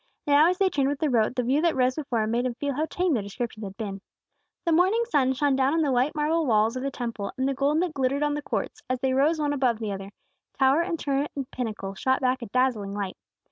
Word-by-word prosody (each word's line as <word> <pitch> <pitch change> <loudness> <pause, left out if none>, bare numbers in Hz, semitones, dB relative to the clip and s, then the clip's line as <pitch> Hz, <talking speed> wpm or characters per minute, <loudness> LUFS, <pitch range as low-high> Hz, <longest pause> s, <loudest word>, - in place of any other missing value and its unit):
Now 295 +3 +5
as 365 - 0
they 390 - +3
turned 275 -6 +1
with 285 - -1
the 300 -1 0
road, 230 0 +2
the 250 - 0
view 265 +5 +2
that 335 -1 +2
rose 255 0 +2
before 260 -6 -1
him 215 - -2
made 240 +2 +1
him 240 - -4
feel 285 +2 -2
how 310 +4 -1
tame 360 -1 0
their 230 - +1
descriptions 215 +2 -5
had 195 0 -9
been. 200 -4 -5 0.6
The 335 - +2
morning 375 +8 +3
sun 270 - +2
shone 275 +1 +1
down 270 +3 +2
on 325 - +2
the 285 - +1
white 255 +5 +1
marble 310 +1 +1
walls 220 0 +3
of 255 - -3
the 275 - -1
Temple 230 -6 -4
and 260 +1 0
the 275 - 0
gold 285 +5 +1
that 350 -4 -3
glittered 275 +1 0
on 295 0 +1
the 295 - -3
courts, - - -4
as 255 -1 0
they 265 -1 +1
rose 300 +5 +2
one 295 -1 0
above 255 -5 +1
the 215 -2 -4
other; 195 0 -6 0.5
tower 270 +3 +4
and 340 -1 -2
turret 280 -1 -1
and 275 -3 -5
pinnacle 215 -5 -4
shot 260 +6 +1
back 255 0 0
a 235 - -5
dazzling 220 -4 0
light. 200 -2 -3
265 Hz, 265 wpm, -26 LUFS, 235-295 Hz, 0.6 s, Now